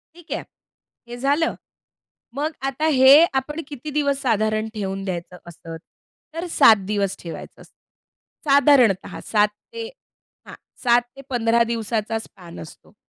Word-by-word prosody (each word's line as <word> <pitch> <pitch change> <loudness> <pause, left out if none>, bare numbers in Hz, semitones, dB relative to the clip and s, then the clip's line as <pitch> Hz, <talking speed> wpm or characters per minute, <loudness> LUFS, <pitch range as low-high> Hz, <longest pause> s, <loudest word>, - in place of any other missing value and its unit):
ठीक 345 -1 -17
आहे, - - -3 0.6
हे 240 0 -8
झालं. 285 +5 +1 0.8
मग 300 +3 -1 0.2
आता 275 +4 -2
हे 270 +4 +8
आपण 295 +5 -2
किती 290 +1 -8
दिवस 280 -2 0
साधारण 215 -2 0
ठेवून 195 -2 -4
द्यायचं 180 -1 -5
असंच? 165 -1 -10 0.5
तर 330 +2 -4
7 215 -9 +5
दिवस 200 -2 -1
ठेवायचं 165 -2 -9
असतं. - - -18 0.8
साधारणतः 275 -9 +4
7 210 -1 +4 0.3
ते 460 -1 -5 0.6
हां, - - -10 0.3
7-15 240 -1 +1
दिवसाचा 225 -1 -2
स्पॅन 175 - -12
असतो. 80 - -14
235 Hz, 125 wpm, -22 LUFS, 210-280 Hz, 0.8 s, हे